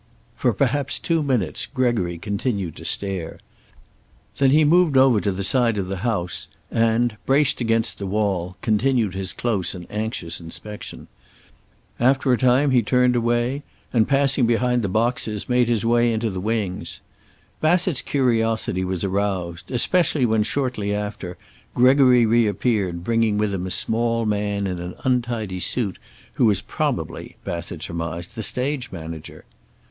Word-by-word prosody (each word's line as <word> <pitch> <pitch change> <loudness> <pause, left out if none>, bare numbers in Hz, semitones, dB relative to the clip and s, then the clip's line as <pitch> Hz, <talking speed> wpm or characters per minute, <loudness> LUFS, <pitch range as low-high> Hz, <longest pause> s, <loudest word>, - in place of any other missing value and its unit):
For 125 - +1
perhaps 140 +5 0
two 165 -2 0
minutes 130 -9 0
Gregory 120 -10 0
continued 100 - -3
to - - -9
stare. 95 -5 -1 1.0
Then 135 -1 +4
he 150 +3 +5
moved 165 -2 +4
over 130 -5 +5
to 100 - 0
the 95 +1 -3
side 115 +1 +2
of 95 -2 -2
the 95 - -3
house 90 -4 -2 0.2
and 115 0 +1
braced 135 -1 +3
against 115 -1 0
the 100 - -4
wall 95 -3 -1
continued 115 -2 +1
his 95 0 -3
close 100 -7 -1
and 90 -1 -8
anxious 105 -6 -4
inspection. 105 +5 -9 0.9
After 130 +1 +3
a - - +3
time 130 +2 +3
he 125 -2 +4
turned 125 +2 +2
away 120 +3 0 0.3
and, 115 -3 +3
passing 135 -3 +3
behind 125 +1 +2
the 100 - -2
boxes, 110 0 -1
made 125 -1 +2
his 115 -2 0
way 120 0 +3
into 110 0 -1
the 95 -1 -4
wings. 105 -3 -3 0.6
Bassett's 175 -1 +2
curiosity 115 -7 0
was 90 -2 -2
aroused, 95 -3 -2
especially 145 +2 +2
when, 110 -2 +2
shortly 105 -4 -1
after, 105 -3 -5 0.4
Gregory 125 -1 +5
reappeared, 105 -5 +1
bringing 115 0 +1
with 105 -1 0
him 95 -1 -3
a - - -4
small 115 +4 0
man 100 -1 -1
in 90 -2 -3
an 90 +1 -6
untidy 120 -7 -1
suit 100 +2 -1 0.4
who - - +4
was 105 -3 +1
probably, - - -3
Bassett 85 -1 -5
surmised, 85 -1 -5
the 110 - -5
stage 130 +4 -2
manager. 80 -3 -8
110 Hz, 150 wpm, -22 LUFS, 95-125 Hz, 1.0 s, he